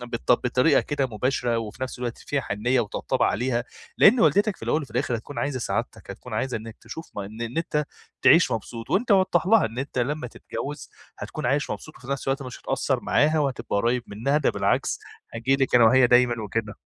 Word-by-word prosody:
بط 120 0 0
بطريقة 125 +4 +3
كده 145 -2 -1
مباشرة 120 0 -1
وفي 115 +3 -6
نفس 130 -1 -4
الوقت 120 -1 -4
فيها 145 - -2
حنية 120 +3 0
وطبطبة 105 -4 -1
عليها، 120 +1 0 0.3
لإن 230 +5 +7
والدتك 205 -2 +3
في - - -22
الأول 155 - 0
وفي 140 - -10
الآخر 125 -1 -1
هتكون 130 +6 -8
عايزة 140 -2 -1
سعادتك، 120 - -4
هتكون - - -10
عايزة 130 -1 -1
إنك 110 0 -8
تشوف 160 - -9
إن 105 +3 -7
إن 120 +3 -4
أنتَ 150 -2 0 0.4
تعيش - - +6
مبسوط 115 -1 -5
وأنتَ 225 +6 +1
وضح 185 -3 +3
لها 220 +2 +5
إن 115 +2 -8
أنتَ 135 0 -4
لما 140 +2 -1
تتجوز 145 +4 -7 0.3
هتكون - - -5
عايش 140 +4 0
مبسوط 155 - -7
وفي 125 - -14
نفس 140 -1 -3
الوقت 135 +1 0
مش 125 -2 -9
هتقصر - - -1
معاها، 155 +2 +2
وهتبقى 135 -7 -1
قريب 120 +4 +1
منها، 130 +8 0
ده 150 - +2
بالعكس - - 0 0.3
هاجي 125 +4 +1
لكِ 135 -2 0
أنا 120 -1 +7
وهي 125 +2 +6
دايمًا 120 -2 +3
وكده، 105 0 -3
125 Hz, 200 wpm, -25 LUFS, 120-145 Hz, 0.4 s, لإن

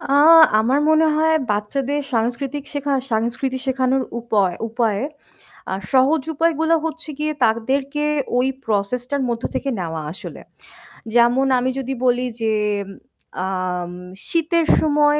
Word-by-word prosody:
আ - - -11 0.6
আমার 250 +6 +2
মনে 315 0 +4
হয় 320 +1 +3 0.2
বাচ্চাদের 265 +8 -1
সাংস্কৃতিক 255 +5 -2
শেখা 285 -1 -2 0.2
সাংস্কৃতি 235 +4 -1
শেখানোর 260 0 +1 0.2
উপয় 205 -6 +1
উপায়ে 225 -3 0 0.7
আর 190 - -2
সহজ 270 +3 +4
উপায়গুলো 325 +1 +2
হচ্ছে 325 0 -5
গিয়ে 305 0 0
তাদেরকে 270 +6 0 0.3
ওই 250 +1 +2 0.2
process 215 +3 0
টার 285 -1 0
মধ্য 230 -1 -3
থেকে 275 - -1
নেওয়া 165 -3 -4
আসলে। 180 - -9 0.7
যেমন 240 +3 +4
আমি 255 +1 0
যদি 270 0 -3
বলি 250 0 +2 0.2
যে, 220 -1 +1 0.9
আম 180 -2 -3 0.4
শীতের 335 0 +1
সময় 295 -1 +3
260 Hz, 125 wpm, -20 LUFS, 225-295 Hz, 0.9 s, মনে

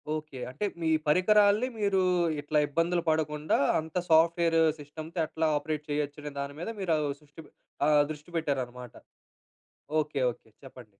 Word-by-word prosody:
Okay. 150 -4 -7
అంటే 170 +11 -3 0.2
మీ 160 - +1 0.2
పరికరాల్ని 205 +7 +4
మీరు 200 -2 +2 0.4
ఇట్లా 150 +1 +1
ఇబ్బందులు 170 +3 0
పడకుండా 155 -1 0 0.2
అంత 160 +2 -8
సాఫ్ట్‌వే‌ర్ 165 +1 +4 0.2
సిస్టమ్‌తో 155 +4 -8
ఎట్లా 160 +1 -1
ఆపరేట్ 150 0 -3
చేయొచ్చు 145 0 -2
అనే 150 - -5
దాని 140 +1 -4
మీద 175 - -4
మీరు 175 -4 0
ఆహ్, 150 -1 -1
శృ‌ష్టి 150 +1 -14
పె - - -19 0.4
ఆహ్, 150 -1 +5
దృష్టి 150 +2 -10
పెట్టారన్నమాట. 125 -5 -3 1.1
ఓకె. 150 -2 -3
ఓకె. 115 - -17
చెప్పండి. 130 -3 -12
155 Hz, 145 wpm, -29 LUFS, 145-165 Hz, 1.1 s, ఆహ్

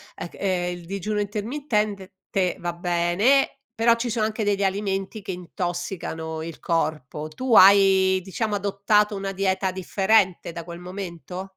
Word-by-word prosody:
ec 175 - -7
eh 180 -2 -1
il 175 -1 -8
digiuno 200 +3 -3
intermittente 210 -2 -2 0.2
te 185 -2 0
va 175 0 -3
bene, 175 +11 +2 0.2
però 230 +1 +4
ci 235 +1 -3
sono 220 -1 0
anche 215 0 -2
degli 200 -1 +1
alimenti 195 +1 -2
che 190 - -5
intossicano 175 -2 -4
il 165 0 -7
corpo. 155 -3 -2
Tu 240 +8 0
hai 190 -1 +7
diciamo 205 +3 -2
adottato 205 +1 +1
una 195 0 -3
dieta 190 -1 0
differente 190 0 +1
da 170 0 -7
quel 170 +1 -9
momento? 180 0 -7
190 Hz, 145 wpm, -24 LUFS, 175-210 Hz, 0.2 s, hai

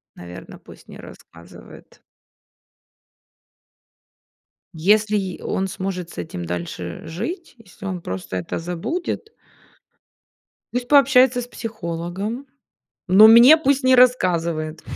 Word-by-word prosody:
Наверно, 90 +1 -11
пусть - - -17
не - - -12
рассказывает. 85 +1 -15 2.7
Если 210 +5 +2
й 190 -3 -5
он 190 0 -2
сможет 185 -2 -5
с - - -15
этим 90 0 -6
дальше 85 0 -6
жить, 330 - -6
если 200 -2 -14
он 185 -3 -4
просто 95 - -6
это 90 - -5
забудет 320 - -5 1.4
пусть 245 0 -3
пообщается 260 -3 +4
с 240 - -8
психологом, 205 +3 -6 0.6
но 205 +4 +8
мне 240 +7 +8
пусть 280 -3 0
не 255 0 +5
рассказывает. 170 -10 +1
190 Hz, 105 wpm, -21 LUFS, 160-245 Hz, 2.7 s, но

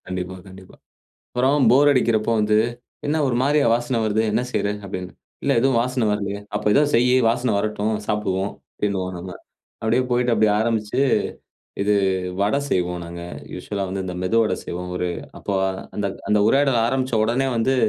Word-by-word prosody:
கண்டிப்பா, 95 0 -4
கண்டிப்பா. 95 -1 -14 0.6
அப்புறம் 130 +1 +3
போர் 140 +3 +6
அடிக்கிறப்போ 115 -4 +2
வந்து, 105 0 +3 0.5
"என்ன 150 +2 +1
ஒரு 125 - 0
மாரியா 145 +1 +3
வாசன 120 0 -1
வருது 110 0 +1
என்ன 110 +3 +1
செய்ற?" 100 - 0 0.2
அப்டின்னு 90 -2 -6 0.3
"இல்ல - - +2
எதுவும் 130 -1 +3
வாசனை 125 -1 0
வரலையே." 100 -1 -2 0.2
"அப்ப - - -3
ஏதோ 145 - +5
செய்யு, 125 +2 +4
வாசனை 120 +1 0
வரட்டும். 105 +1 -1
சாப்பிடுவோம்" 100 -2 -1 0.2
அப்டின்னுவோம் 95 -3 -2
நம்ம. 90 +1 -7 0.5
அப்டியே 115 +3 +2
போயிட்டு, 120 0 +2
அப்டி 110 0 +4
ஆரம்பிச்சு, 110 +2 0 0.8
இது 105 +1 +2 0.5
வடை 105 +7 +2
செய்வோம் 90 -1 0
நாங்க. 85 0 -8 0.3
யூசுவல்லா 100 -2 -4
வந்து 95 +1 -3
இந்த 90 - -4
மெது 90 +5 +1
வடை 105 -4 +1
செய்வோம். 90 +1 -5
ஒரு 90 - -1 0.3
அப்ப - - -16 0.5
அந்த 105 -1 -1 0.2
அந்த 105 - +4
உரையாடல் 135 -3 +3
ஆரம்பிச்ச 130 0 -1
உடனேயே 130 +4 +1
வந்து, 130 +4 +2
110 Hz, 160 wpm, -22 LUFS, 95-125 Hz, 0.8 s, போர்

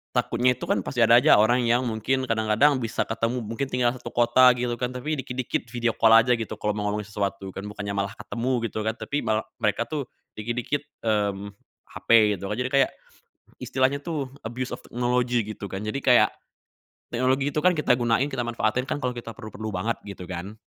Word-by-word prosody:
takutnya 125 +2 +2
itu, - - -10
kan, - - +1
pasti 125 - -4
ada 115 +2 +7
aja - - +6
orang 120 +4 +4
yang 120 +2 +3
mungkin 125 +4 -1
kadang-kadang 115 +5 +3
bisa 115 - -1
ketemu, 115 +2 -1
mungkin 115 +5 -3
tinggal 125 -1 +2
satu - - -8
kota, 120 +2 +5
gitu, 120 -1 -1
kan, 125 - 0
tapi 125 +5 -3
dikit-dikit 125 -2 -3
video 120 -2 0
call 110 0 +4
aja 125 - +3
gitu 115 -2 -5
kalo 105 0 0
mau 105 -1 -2
ngomongin 105 0 -3
sesuatu, 100 -1 -3
kan, 95 - -4
bukannya 100 -1 -5
malah 100 0 -2
ketemu, 120 +2 -3 0.2
gitu, - - -4
kan. 110 +1 -1
Tapi 145 +1 -3
mal 110 -1 0 0.2
mereka 110 +2 +1
tuh 145 -5 -4 0.3
dikit-dikit, 120 +6 -2 0.2
mmm, 100 -2 -1 0.4
HP 105 -4 +3
gitu 100 - -5
kan, 105 - -2
jadi 125 +2 -2
kayak 135 -1 +3 0.7
istilahnya 135 +2 0
tuh 150 -4 -3 0.2
abuse 125 +2 -4
of - - -18
technology, 125 0 0 0.2
gitu, 100 - -7
kan. 95 - -3
Jadi 110 +6 -3
kayak 125 -1 +6 0.8
teknologi 130 +3 +1
itu, 150 - -1
kan, 180 - +6
kita 150 - +1
gunain, 120 +3 +2
kita 125 -2 -2
manfaatin 120 +3 -1
kan 145 - -2
kalo 125 - +1
kita 120 -2 -7
perlu-perlu 110 0 -7
banget, 110 +6 -1
gitu, 100 -2 -8
kan, 95 +3 -6
120 Hz, 195 wpm, -25 LUFS, 110-125 Hz, 0.8 s, ada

